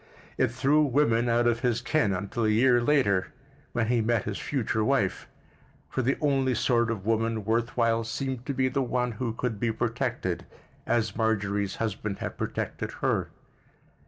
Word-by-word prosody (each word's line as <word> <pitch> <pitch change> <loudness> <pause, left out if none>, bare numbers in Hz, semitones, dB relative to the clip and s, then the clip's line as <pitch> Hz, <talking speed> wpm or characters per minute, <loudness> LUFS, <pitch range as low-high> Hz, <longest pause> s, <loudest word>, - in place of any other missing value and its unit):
It 130 - +2
threw 135 +5 +2
women 120 -5 +2
out 120 +1 +3
of 120 -1 +2
his 120 -2 +1
ken 125 -4 +1
until 100 +5 -2
a - - +3
year 120 +3 +4
later, 120 -9 +2 0.4
when 120 - 0
he 120 -1 +3
met 115 0 +1
his 105 -1 -4
future 115 -5 -1
wife; 120 -6 0 0.6
for 130 - 0
the 130 +3 +1
only 135 -3 +1
sort 120 0 +2
of 105 -4 -3
woman 115 -1 0
worth 115 +3 0
while 115 -1 +2
seemed 125 +2 -4
to 140 - -1
be 130 0 +2
the 135 +2 0
one 125 -1 0
who 115 +1 -3
could 115 -2 -3
be 115 0 +1
protected 115 -4 -2 0.4
as 110 -4 +1
Marjorie's 100 -3 0
husband 105 -2 -3
had - - -5
protected - - -3
her. - - +1
115 Hz, 170 wpm, -27 LUFS, 110-125 Hz, 0.6 s, year